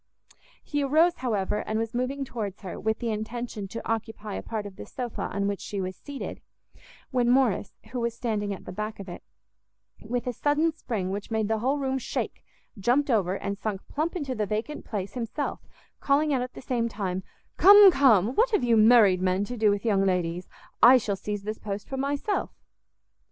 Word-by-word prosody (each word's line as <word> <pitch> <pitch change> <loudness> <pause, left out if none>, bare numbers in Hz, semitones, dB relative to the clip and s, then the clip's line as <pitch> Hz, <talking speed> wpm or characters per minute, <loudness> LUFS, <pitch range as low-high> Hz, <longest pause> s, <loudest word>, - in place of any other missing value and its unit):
He 290 -1 -2
arose, 320 +5 +3
however, 210 -5 -1
and 215 0 -2
was 225 0 -2
moving 260 +3 -2
towards 210 -6 -5
her, 190 -3 -6
with 220 +1 0
the 235 -2 -2
intention 220 -1 -4
to 230 +4 -7
occupy 225 -2 -3
a - - -3
part 220 -2 -4
of 200 -2 -10
a - - -6
sofa 245 -3 -4
on 200 0 -1
which 200 -1 -2
she 200 - -5
was 185 0 -3
seated, 285 -2 -7 0.7
when 245 -2 +2
Morrice, 245 -6 +2 0.2
who 250 - -3
was 235 -1 -1
standing 215 -4 -2
at 195 - -7
the - - -7
back 210 +3 -5
of 195 - -8
it, 175 - -8 0.8
with 240 +2 -3
a 250 - -2
sudden 295 +6 +1
spring 210 - -3
which 200 +1 -5
made 220 -2 0
the 220 0 0
whole 265 +6 +1
room 265 -1 -1
shake, - - -4 0.4
jumpt 255 +7 +2
over, 195 -5 +2
and 200 0 -4
sunk 205 -2 -4
plump 315 +5 -2
into 285 -7 -2
the 215 -3 -2
vacant 220 +9 -3
place 200 -2 -4
himself, 250 +4 -3 0.4
calling 295 +1 +2
out 260 - +1
at 250 0 -5
the - - -9
same 240 -3 0
time, 190 -3 -3 0.4
"Come, 405 0 +9
come, 240 - +4
what 465 - +3
have 420 - +1
you 235 -2 +4
married 215 -4 +6
men 185 +1 +1
to 245 - -5
do 215 -2 +3
with 205 +2 0
young 200 -3 +3
ladies? 180 -2 -1 0.3
I 255 +2 +9
shall 215 -5 -1
seize 205 +1 -5
this 215 +1 -4
post 200 -1 -5
for 270 - -5
myself." 280 +9 -1
225 Hz, 200 wpm, -27 LUFS, 200-260 Hz, 0.8 s, Come